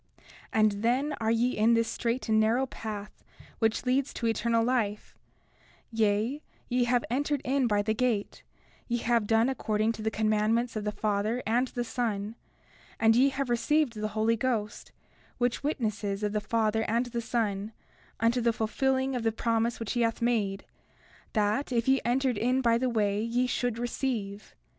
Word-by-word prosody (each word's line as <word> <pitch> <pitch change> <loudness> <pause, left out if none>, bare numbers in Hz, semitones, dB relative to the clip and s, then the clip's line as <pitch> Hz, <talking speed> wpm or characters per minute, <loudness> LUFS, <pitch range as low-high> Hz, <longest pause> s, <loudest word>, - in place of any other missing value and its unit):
31:18 - - -27 0.3
And 215 -1 +4
then 260 +6 +1
are 220 - +1
ye 235 +2 +2
in 225 +2 +4
this 230 0 +2
strait 240 +3 -2
and 220 -1 +3
narrow 230 +5 +2
path 210 -5 -7 0.4
which 225 +2 +1
leads 260 +2 +1
to 235 - -3
eternal 230 0 +1
life; 225 -4 -1 0.8
yea, 225 +5 +1 0.3
ye 245 0 +1
have 245 0 +1
entered 290 +3 0
in 265 -1 +1
by 205 -2 +1
the 220 +1 0
gate; 225 -3 -1 0.5
ye 240 - 0
have 230 -2 +1
done 225 +2 +3
according 220 -4 0
to 225 - -7
the 220 - 0
commandments 220 +2 +1
of 215 -1 -3
the 210 - 0
Father 215 +3 -1
and 240 +4 +2
the 245 -1 -3
Son; 220 -3 -2 0.7
and 225 0 +5
ye 265 +3 +5
have 275 0 -3
received 255 +3 +1
the 215 -1 -3
Holy 225 +1 +3
Ghost, 220 -3 -2 0.5
which 245 -1 0
witnesses 215 -8 -2
of 210 0 -1
the 210 - 0
Father 220 0 +1
and 235 +3 +1
the 235 -1 -4
Son, 215 -3 -2 0.5
unto 230 +2 +2
the 235 0 +3
fulfilling 265 +4 0
of 245 - -1
the 225 0 +1
promise 230 +1 0
which 225 -3 -4
he 240 - 0
hath 230 -1 +1
made, 215 -5 0 0.7
that 215 +6 0
if 235 -1 0
ye 265 0 +4
entered 250 -1 +1
in 250 +3 +2
by 235 -3 +3
the 250 +2 +1
way 210 -3 +1
ye 235 +3 0
should 245 -2 -1
receive. 235 -4 -3
230 Hz, 175 wpm, -28 LUFS, 215-245 Hz, 0.8 s, and